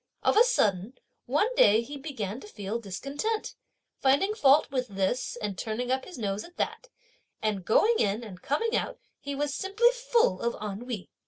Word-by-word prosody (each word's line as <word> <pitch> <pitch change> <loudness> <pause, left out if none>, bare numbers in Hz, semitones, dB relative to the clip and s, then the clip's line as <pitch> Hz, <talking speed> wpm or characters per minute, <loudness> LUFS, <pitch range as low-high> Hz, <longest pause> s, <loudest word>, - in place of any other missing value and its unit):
Of - - +3
a 445 - +8
sudden, 210 - +1 0.3
one 300 - +2
day 220 - +5
he 290 +5 -8
began 255 -7 -5
to 420 - -11
feel 210 - -4
discontent, 275 - -3 0.5
finding 285 +10 +3
fault 290 -8 +4
with 255 -2 -1
this 195 +5 -1
and 205 -2 -3
turning 230 +6 -3
up 260 0 0
his 365 - -10
nose 205 -2 -2
at 350 - -15
that; - - -3 0.5
and 210 -3 -1
going 445 - +3
in 205 +3 +1
and 190 -5 -10
coming 450 +11 0
out - - -1 0.2
he 280 0 -5
was 290 0 -1
simply 410 +8 +3
full 485 - +1
of 235 0 -1
ennui. 210 +1 -5
255 Hz, 175 wpm, -28 LUFS, -, 0.5 s, a